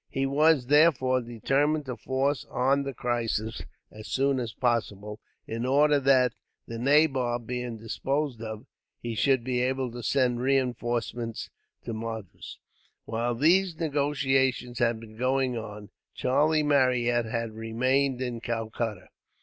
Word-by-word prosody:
He 135 - -1
was, 145 0 +3
therefore, 130 -3 +4
determined 140 +6 0
to 125 -2 -4
force 135 +3 -1
on 135 +3 +2
the 140 -1 -4
crisis, 115 -2 -2 0.3
as 110 0 -10
soon 135 0 +1
as 120 -3 -3
possible; 105 -3 -2 0.3
in 115 +1 -4
order 145 +3 +4
that, 130 -3 +4 0.3
the 115 0 -6
nabob 130 -3 +2
being 125 -1 -4
disposed 135 +3 -2
of, 110 -1 -6 0.3
he 120 -1 -4
should 130 +3 +2
be 125 0 -1
able 130 0 -1
to 120 +1 -7
send 125 -1 +1
reinforcements 120 -3 -1 0.3
to 115 - -5
Madras. 110 -3 -7 0.5
While 115 +2 -1
these 170 +5 +3
negotiations 135 -5 0
had 115 -1 +1
been 110 -1 -13
going 130 0 +1
on, 105 -2 -7 0.2
Charlie 150 +4 +2
Marryat 125 -4 +2
had 115 0 -3
remained 130 +4 0
in 120 -2 -4
Calcutta. 115 -4 -3
125 Hz, 135 wpm, -27 LUFS, 115-135 Hz, 0.5 s, therefore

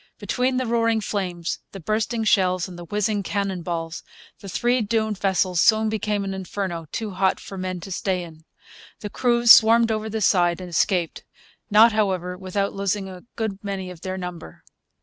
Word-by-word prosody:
Between 255 0 -1
the 255 - 0
roaring 230 -1 +1
flames, 180 -5 -3
the 195 - -7
bursting 220 +5 -1
shells, 185 -4 +2
and 180 - -10
the 175 0 -9
whizzing 210 +2 -1
cannon 195 -2 -2
balls, 165 -1 -4 0.4
the 195 - -9
three 240 +6 +1
doomed 220 -1 -1
vessels 185 -3 +1
soon 220 -1 +4
became 210 -1 -1
an 195 0 -3
inferno 185 -3 -4
too 220 -2 -4
hot 190 0 +1
for 195 - -9
men 185 -1 -4
to 195 - -9
stay 185 0 -1
in. 160 -2 -13 0.6
The 210 - -6
crews 240 -1 +4
swarmed 230 0 +7
over 220 0 -2
the 220 +1 -3
side 175 -3 +3
and 180 -1 -8
escaped; 175 -1 0 0.5
not, 220 +2 +7
however, 190 -4 -1
without 195 +2 -2
losing 195 0 -2
a 185 +1 -11
good 210 -4 -4
many 195 -2 -4
of 170 -2 -12
their 185 +1 -4
number. 180 - -8
195 Hz, 180 wpm, -23 LUFS, 180-220 Hz, 0.6 s, swarmed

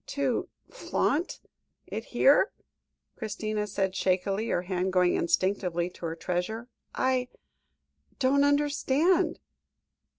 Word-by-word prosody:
] - - -54
"To 270 -4 0 0.2
flaunt 350 - -1 0.5
it 225 - -5
here?" 280 - +4 0.6
Christina 215 -1 -3
said 195 -2 -1
shakily, 195 +4 0
her 175 - 0
hand 185 0 -1
going 180 -1 +3
instinctively 180 -1 0
to 170 - -6
her 165 - -4
treasure. 180 +8 -3 0.3
"I 255 -1 +1 0.9
don't 275 +2 +3
understand." 290 +3 +2
215 Hz, 105 wpm, -28 LUFS, 185-270 Hz, 0.9 s, here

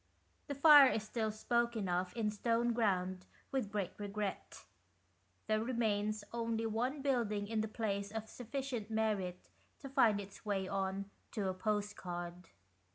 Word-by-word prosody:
The 285 - -3
fire 285 -1 +9
is 220 - -1
still 220 0 -1
spoken 235 -1 0
of 180 +1 0
in 215 -2 +1
Stoneground 215 -5 +1 0.3
with 255 -7 -1
great 200 -3 -1
regret. 205 -1 -4 0.8
There 215 0 +1
remains 215 -3 0
only 230 -1 -1
one 250 +6 -1
building 220 -7 +1
in 220 0 0
the 220 - -1
place 200 -2 -2
of 220 0 -4
sufficient 245 -2 -4
merit 210 -5 -1 0.3
to 275 - -8
find 230 -6 +4
its 195 -1 -9
way 195 -3 -1
on 195 +1 -2 0.2
to 200 -4 -1
a - - -1
postcard. 185 -4 -3
215 Hz, 140 wpm, -35 LUFS, 200-235 Hz, 0.8 s, fire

